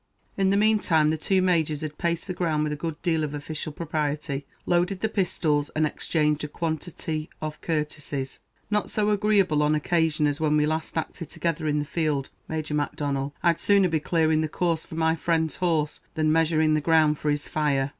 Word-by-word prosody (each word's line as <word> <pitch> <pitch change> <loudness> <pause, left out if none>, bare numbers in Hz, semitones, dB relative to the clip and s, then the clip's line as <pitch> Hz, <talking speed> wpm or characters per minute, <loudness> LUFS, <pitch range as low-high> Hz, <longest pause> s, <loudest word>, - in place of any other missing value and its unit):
In 195 -1 +2
the 200 - +3
meantime 205 -8 +3
the 155 - +1
two 190 +4 +1
Majors 160 -5 +1
had 150 -1 -6
paced 170 -1 -1
the 185 - -4
ground 160 -4 0
with 150 -1 -1
a - - -2
good 155 0 -5
deal 160 -3 +1
of 150 -1 -3
official 155 +1 -5
propriety, 150 -3 -3 0.2
loaded 180 +2 +1
the 220 - +2
pistols, 160 -8 0
and 155 0 +3
exchanged 150 0 0
a - - -2
quantity 160 0 -4
of 155 0 -5
courtesies. 150 -4 -3 0.3
"Not 210 0 +1
so 210 0 +1
agreeable 200 -7 +3
an 150 +1 +3
occasion 155 -1 +1
as 145 +1 0
when 150 -1 +3
we 150 - +3
last 155 +1 -2
acted 160 0 -4
together 165 -2 -2
in 150 0 +1
the 145 - -1
field, 150 -3 -1 0.2
Major 155 -1 -3
Macdonnel; 145 -1 -2
I'd 170 -2 +3
sooner 200 -2 +4
be 160 -1 +1
clearing 160 0 +2
the 155 - 0
course 165 0 0
for - - -10
my 160 0 +2
friend's 160 -1 0
horse, 160 -4 0 0.2
than 155 -1 +2
measuring 160 -1 +3
the 155 - +2
ground 155 -1 +3
for 150 - -1
his 145 0 -1
fire." 140 -3 0
155 Hz, 195 wpm, -26 LUFS, 150-170 Hz, 0.3 s, sooner